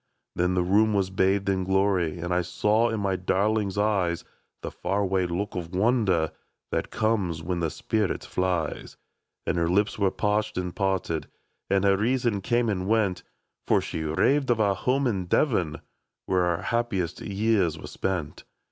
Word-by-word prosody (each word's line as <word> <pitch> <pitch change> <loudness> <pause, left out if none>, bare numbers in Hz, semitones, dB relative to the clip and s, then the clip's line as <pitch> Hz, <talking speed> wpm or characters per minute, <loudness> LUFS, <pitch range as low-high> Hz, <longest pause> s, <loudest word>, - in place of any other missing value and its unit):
*^' - - -53 0.3
Then 90 +1 +1
the 90 - +2
room 105 +4 +3
was 95 -1 +1
bathed 95 +1 +1
in 95 -1 +1
glory^ 95 -3 +1
And 90 0 -1
I 90 - +2
saw 105 +6 +1
in 110 -1 -2
my 100 -2 0
darling's 100 +2 0
eyes 95 -5 +1 0.4
The - - -4
far 100 +3 -1
away 95 -2 +1
look 95 +4 -3
of 90 -1 -5
wonder 95 -6 +2 0.4
That - - -1
comes 100 -8 0
when 90 +1 -2
the 80 -2 0
spirit 105 +3 -1
flies; 90 -4 -2 0.5
And - - 0
her 85 0 +1
lips 100 +4 +1
were 100 -2 +3
parched 105 +2 -1
and 90 -1 -3
parted, 95 -5 -1 0.4
And 100 -1 +2
her 100 -1 +4
reason 115 -1 +1
came 120 +3 +1
and 95 -3 -1
went, 105 -4 +1 0.5
For - - +4
she 80 - -4
raved 130 - +1
of 120 -2 +2
our 100 -2 +3
home 130 +8 0
in 100 -7 0
Devon, 90 - +1 0.4
Where 90 -1 +2
our 85 0 -1
happiest 110 -8 -1
years 100 -5 +1
were - - -9
spent. 90 -6 -3
95 Hz, 175 wpm, -26 LUFS, 90-105 Hz, 0.5 s, her